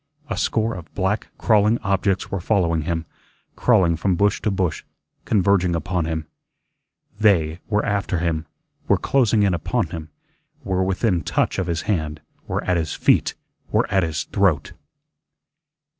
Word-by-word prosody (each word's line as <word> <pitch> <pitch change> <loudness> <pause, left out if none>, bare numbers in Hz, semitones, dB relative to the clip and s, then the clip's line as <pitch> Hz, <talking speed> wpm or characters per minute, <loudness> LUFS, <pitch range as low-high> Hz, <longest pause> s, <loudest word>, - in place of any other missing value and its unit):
A - - 0
score 115 0 0
of 85 -4 -9
black, 100 +2 0
crawling 110 +1 +3
objects 100 -1 0
were 95 - -1
following 85 -5 +1
him, 80 +1 -2 0.5
crawling 95 -9 +3
from 90 +3 0
bush 100 +3 +2
to 110 - 0
bush, 95 -4 -1 0.4
converging 95 -4 +2
upon 90 0 -1
him. 80 -1 -3 0.9
"THEY" 85 -7 +3
were 105 0 +1
after 100 -3 0
him, 85 -1 -1 0.4
were - - +4
closing 115 -6 +2
in 100 -2 +3
upon 85 0 -1
him, 80 -2 -7 0.5
were 95 -1 0
within 95 -1 +1
touch - - 0
of 95 - -1
his 85 -2 -2
hand, 80 -7 -1 0.3
were - - -2
at 90 -1 +1
his 80 -3 -2
feet - - +2 0.4
WERE - - +3
AT 95 - +4
HIS 80 -3 -1
THROAT. 95 -8 +1
90 Hz, 150 wpm, -22 LUFS, 85-100 Hz, 0.9 s, were